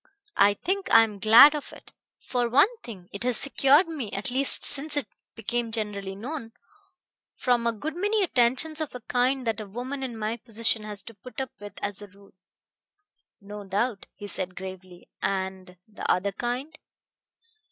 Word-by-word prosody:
I 200 +1 +5
think 380 - -3
I 225 - +8
am 210 -3 -5
glad 225 +8 +8
of 295 -2 -6
it. - - -15 0.2
For 245 -2 -2
one 290 - +4
thing, 190 -7 -10
it 200 - -5
has 250 -2 +4
secured 275 +4 +4
me 280 -11 -5
at 205 +7 -2
least 270 +2 +5
since 295 +1 +3
it 285 - 0 0.3
became 235 +1 -2
generally 205 -3 -4
known 230 +1 -7 0.8
from 240 -2 +1
a - - +3
good 295 +9 -6
many 415 +3 +1
attentions 285 +2 +1
of 305 -4 -5
a 250 - -7
kind 255 +3 0
that 225 -2 -1
a 215 - -7
woman 250 +7 -6
in 250 -4 -5
my 220 +2 -3
position 225 -1 -1
has 205 -2 -6
to 230 - -11
put 235 +6 -10
up 265 -1 -4
with 205 -1 -9
as 205 0 -3
a 205 - -9
rule." 200 +1 -21 1.1
"No 205 0 -9
doubt," 200 +3 -2
he 205 - -9
said 185 -2 0
gravely. 185 -1 -10
"And... 190 -1 -3
the 215 - -3
other 195 +2 0
kind?" 245 +8 -4
230 Hz, 175 wpm, -26 LUFS, 200-265 Hz, 1.1 s, I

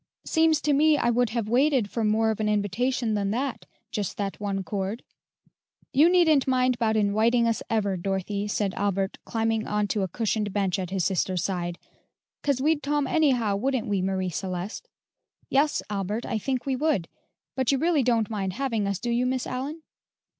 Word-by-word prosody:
"Seems 320 -2 +3
to 295 - +2
me 300 +2 +4
I 240 - +2
would 245 0 +2
have 225 -1 -2
waited 255 -1 +3
for 230 - -1
more 220 +1 +2
of 220 - -4
an 215 -1 0
invitation 220 +3 0
than 200 -1 0
that, 255 +4 -3 0.2
just 205 -4 -3
that 200 -1 -3
one 200 -2 -2
chord." 200 +3 -3 0.9
"You 305 +5 +6
needn't 320 -7 +4
mind 255 -1 +2
'bout 220 -2 +2
inwiting 220 +3 +3
us 230 - 0
ever, 205 -4 0
Dorothy," 195 +2 -2
said 205 -2 -1
Albert, 195 -1 -1
climbing 225 -1 -1
on 210 0 0
to 210 - 0
a 190 - 0
cushioned 210 +1 -1
bench 195 -2 0
at 180 -2 -3
his 190 -2 -1
sister's 185 -2 0
side, 175 -2 -2 0.6
"'cause 280 -3 +1
we'd 300 +2 +2
tome 290 0 0
anyhow, 255 -11 +2
wouldn't 255 +2 -1
we, 200 -4 0
Marie 185 -1 -1
Celeste?" 185 - -5 0.6
"Yes, 290 +2 +2
Albert, 205 +3 -3
I 225 - -2
think 255 +3 -2
we 270 -1 0
would; 270 - 0 0.5
but 260 -1 +1
you 275 - +2
really 320 +1 +2
don't 230 -3 +2
mind 195 -4 -3
having 230 -4 -1
us, 200 -1 -1
do 240 +5 -3
you, 245 +2 +1
Miss 255 0 -1
Allyn?" 280 +6 -5
225 Hz, 185 wpm, -26 LUFS, 200-260 Hz, 0.9 s, You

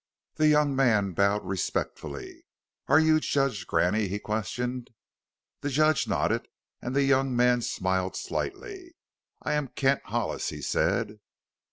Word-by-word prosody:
The 155 0 +2
young 150 -2 +3
man 110 -7 +3
bowed 100 +3 +1
respectfully. 80 -5 -4 0.4
"Are 140 +3 +6
you 160 0 +4
Judge 135 -9 -1
Graney?" 100 +4 +1
he 100 +2 -3
questioned. 120 +4 -3 0.7
The 145 - -3
judge 155 +2 +2
nodded - - 0 0.3
and 125 +2 -4
the 140 - +3
young 135 -1 +2
man 125 0 +3
smiled 95 -3 -1
slightly. 370 -4 -5 0.5
"I - - -1
am 150 -2 0
Kent 135 +1 +1
Hollis," - - -2
he - - -7
said. 110 -2 0
125 Hz, 135 wpm, -27 LUFS, 105-145 Hz, 0.7 s, Are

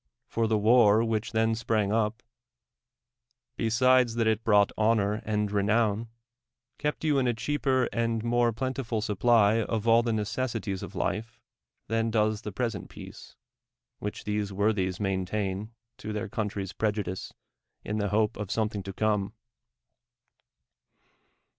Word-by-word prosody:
For 115 - -1
tln' 110 -2 +1
wnr 110 -1 +5
v/liidi 110 -1 -1
then 110 0 +2
sprang 110 -3 0
up, 110 +1 0 1.4
l)(^sid(\s 125 +1 +3
that 115 -1 +1
it 110 0 +1
brought 105 -2 +4
honor 110 -1 +1
and 105 -1 -1
renown, 105 +2 +1 0.7
k'cpt 150 +1 -2
you 150 -3 +2
in 130 - +1
a 120 - +1
chr'aper 135 +1 0
and 115 -1 0
mon^ 120 0 +2
plenti 130 +3 -3
ful 115 -2 -2
sup])ly 110 0 +3
of 110 +1 -3
all 115 +1 +6
th(.' 120 0 -1
necessaries 110 -2 -2
tA' - - -8
life 115 +5 -3 0.5
Hian 115 +1 0
does 110 -1 +1
the 105 - -6
present 115 0 -3
peace, - - -12 0.6
which 105 - -5
these 105 -1 -2
wortliu^s 95 -2 0
main 95 -2 0
tain 100 +1 -3 0.3
to 105 - -5
their 105 +1 -3
country's 100 -2 -3
]n'e.iu<!ie(^ 105 -4 -2 0.5
i?) - - -3
the 105 -1 0
hope 105 +1 +1
of 105 -1 -4
somethinLT 105 0 -2
to 95 - -6
come. 105 -1 0
110 Hz, 140 wpm, -28 LUFS, 105-115 Hz, 1.4 s, all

